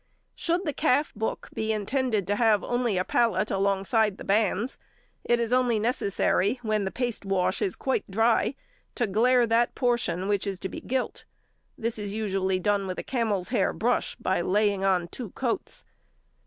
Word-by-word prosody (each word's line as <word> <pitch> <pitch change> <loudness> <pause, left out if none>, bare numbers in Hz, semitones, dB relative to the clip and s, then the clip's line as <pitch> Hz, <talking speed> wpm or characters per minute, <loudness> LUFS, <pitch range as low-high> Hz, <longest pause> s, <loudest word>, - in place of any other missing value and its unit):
Should 345 +3 -1
the 300 - -1
calf 295 0 +1
book 220 +1 -3
be 220 0 -1
intended 220 0 0
to 205 +3 0
have 220 -3 +3
only 245 -5 0
a 185 - +2
pallet 215 -3 +1
alongside 195 +2 +1
the - - -8
bands, 210 +3 0 0.4
it 240 0 +2
is 235 +1 0
only 250 -3 +3
necessary, 210 -1 +1
when 215 -2 0
the - - -1
paste 245 -4 -2
wash 190 -1 0
is 185 - 0
quite 265 -5 -2
dry, 225 +6 +2 0.4
to 240 - +1
glaire 240 +4 +3
that 230 +1 +2
portion 230 -8 0
which 205 0 0
is 195 -2 -3
to 190 - -3
be - - -7
gilt: 260 0 -3 0.5
this 225 -1 -3
is 205 -1 -4
usually 195 -3 0
done 200 0 +1
with 185 - -4
a - - -4
camel's 220 -7 -1
hair 225 -6 +1
brush, 245 +3 0
by 185 -1 0
laying 200 +1 +1
on 185 -3 +2
two 225 +5 -7
coats. 245 -3 -3
215 Hz, 175 wpm, -27 LUFS, 195-240 Hz, 0.5 s, have